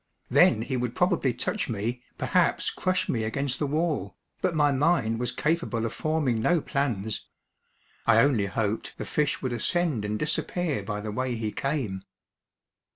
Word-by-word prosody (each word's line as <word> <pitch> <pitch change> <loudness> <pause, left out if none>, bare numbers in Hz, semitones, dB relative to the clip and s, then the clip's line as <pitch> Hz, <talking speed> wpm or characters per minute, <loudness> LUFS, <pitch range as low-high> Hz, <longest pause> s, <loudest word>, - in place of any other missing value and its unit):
Then 110 - +5
he 130 +1 -2
would 125 -1 -2
probably 180 -7 +2
touch 120 - -2
me, 115 +3 -2 0.2
perhaps - - +2
crush 185 -1 0
me 115 -3 0
against 135 +4 -2
the 150 - 0
wall, 150 - -1 0.2
but 180 -3 +1
my 145 -2 +4
mind 135 -6 +2
was 125 0 -1
capable 155 -8 0
of 115 - -3
forming 150 -8 0
no 175 +8 +3
plans. 120 -9 -2 0.8
I 115 -1 +6
only 115 -8 +3
hoped 105 +2 -2
the - - -4
fish 150 -2 0
would 130 -2 -1
ascend 150 - 0
and 105 +1 -1
disappear 155 - -1
by 105 +1 -4
the 105 0 -4
way 130 +2 -1
he 110 -2 -2
came. 130 -10 -2
125 Hz, 160 wpm, -27 LUFS, 110-150 Hz, 0.8 s, I